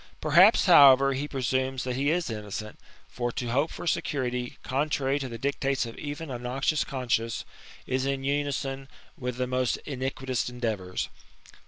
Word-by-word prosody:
Perhaps, 170 +8 +6
however, 140 -6 +8
he 140 +3 -3
presumes 130 -1 -1
that 125 -1 -2
he 140 +3 +1
is 165 -4 0
innocent; 105 0 -6 0.3
for 120 -1 -3
to 120 -2 -3
hope 140 +6 +2
for - - -8
security, 125 -6 -1
contrary 140 0 0
to 135 -2 -4
the 115 - -6
dictates 135 +1 -1
of 115 - -8
even 145 0 -5
a 125 - -4
noxious 135 +5 0
conscience, 120 -3 -2 0.4
is 130 0 -1
in 135 -1 -1
unison 140 -1 -2 0.3
with 125 -5 -4
the 125 - 0
most 125 -1 0
iniquitous 130 -2 -2
endeavours. 110 -7 -3
130 Hz, 155 wpm, -27 LUFS, 125-140 Hz, 0.4 s, however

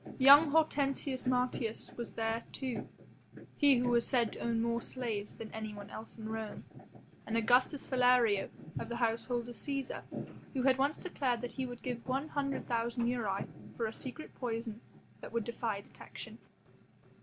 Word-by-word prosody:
Young 285 +3 +9
Hortensius 280 -4 +1
Martius 250 -2 0
was 235 - -5
there, 225 +1 -1
too, 260 -3 -3 0.7
he 285 -2 +6
who 245 0 +2
was 240 -1 +3
said 240 -4 +2
to - - -8
own 230 -1 0
more 235 +1 +1
slaves 225 -6 -3
than 225 - -8
anyone 210 -2 -6
else 220 - -8
in 220 -1 -6
Rome, 220 -1 -4 0.6
and 225 - 0
Augustus 250 +5 +3
Philario 245 -5 +4 0.3
of - - -5
the 235 - -2
household 235 +1 0
of 240 - -6
Cæsar, 275 +3 -3 0.5
who 255 - +1
had 265 0 +4
once 280 +3 +2
declared 260 -9 -1
that 245 - -4
he 260 -1 -3
would 245 -1 -8
give 245 -1 -4
one 270 +4 -1
hundred 275 -2 -1
thousand 235 0 0
aurei 215 -6 0 0.3
for 230 - 0
a 220 - -3
secret 270 +4 -6
poison 230 -2 -3 0.4
that - - -9
would 230 -1 0
defy 225 -2 -2
detection. - - -10
240 Hz, 165 wpm, -34 LUFS, 225-260 Hz, 0.7 s, Young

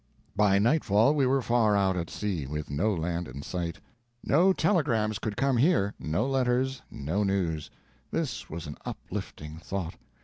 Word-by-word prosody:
By 100 -1 +4
nightfall 115 +1 +4
we 140 -4 +2
were 135 0 +2
far 115 -4 +3
out 95 -2 +2
at 85 -2 -3
sea, 90 -10 -3
with 75 +1 -5
no 95 +10 +1
land 85 -1 -2
in 70 +2 -8
sight. 85 -1 -4 0.4
No 175 +7 +4
telegrams 140 - +1
could 105 -1 -4
come 135 -2 +2
here, 120 - +3
no 80 +9 0
letters, 130 0 +1
no 80 +9 -2
news. 90 -6 -1 0.4
This - - -3
was 85 +1 -6
an 75 - -7
uplifting 75 +1 -6
thought. 90 -1 -4
100 Hz, 160 wpm, -28 LUFS, 85-125 Hz, 0.4 s, By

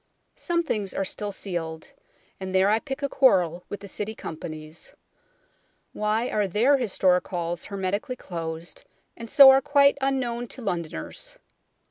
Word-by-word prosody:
Some 340 0 0
things 210 - -2
are 195 - -1
still 205 +2 -3
sealed; 165 -5 -5 0.5
and 190 0 -5
there 190 +2 +4
I 220 - +3
pick 270 +3 -6
a - - +2
quarrel 180 - +3
with 205 - -6
the 200 - -9
City 210 +3 -3
Companies. 155 -2 -8 1.0
Why 215 +3 0
are 210 -2 +1
their 235 +10 +3
historic 185 -6 +2
halls 175 -2 -3
hermetically 200 +5 -3
closed, 165 -5 -6 0.3
and 230 -1 -9
so 275 +1 +10
are 265 0 +5
quite 280 0 +4
unknown 245 -3 -1
to 255 - -8
Londoners 170 - -5
200 Hz, 145 wpm, -25 LUFS, 175-250 Hz, 1.0 s, so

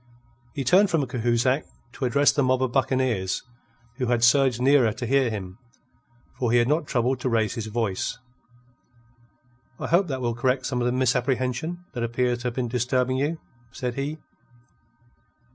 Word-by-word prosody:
He 140 - -2
turned 185 - +4
from 160 -5 +1
Cahusac 125 +2 +1 0.3
to 130 - -3
address 140 +4 +4
the 145 - 0
mob 130 0 +2
of 130 - -1
buccaneers, 130 -7 0 0.5
who 125 - -1
had 120 -1 +1
surged 125 0 +4
nearer 130 -3 +4
to 120 +4 -5
hear 135 0 +2
him, 95 -2 -6 0.8
for 120 -3 0
he 120 - +4
had 120 0 +3
not 150 +1 0
troubled 125 0 0
to 130 - -1
raise 110 -3 +1
his 110 -2 -5
voice. 110 -3 -2 1.6
"I - - -4
hope 175 +3 +2
that 135 -4 -3
will 120 -2 -1
correct 125 +2 0
some 125 -2 -1
of 120 - +1
the - - +1
misapprehension 130 +6 -1
that 120 - -4
appears 120 +1 0
to - - -10
have 120 - -4
been 125 -2 -1
disturbing 125 +2 0
you," 150 +4 -1 0.3
said 125 +1 -4
he. 140 +4 -4
125 Hz, 170 wpm, -25 LUFS, 120-135 Hz, 1.6 s, turned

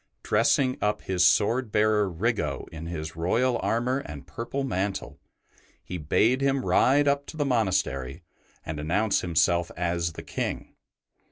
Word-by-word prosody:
Dressing 130 -2 +2
up 105 0 0
his 90 -2 +1
sword 110 +4 +2
bearer 105 -1 +2
Riggo 105 +7 -2
in 80 0 -7
his 80 -2 -5
royal 115 +9 +1
armour 125 +4 0
and 75 - -9
purple 120 - -4
mantle, 95 - -3 0.6
he 90 - -6
bade 115 - +2
him 135 -1 +1
ride 145 +2 +4
up 140 0 +1
to 160 - -9
the 145 - 0
monastery 95 - 0 0.4
and 80 -1 -5
announce 95 +8 +1
himself 85 0 +1
as 85 -1 -1
the - - -8
King. - - -4
105 Hz, 145 wpm, -26 LUFS, 85-125 Hz, 0.6 s, ride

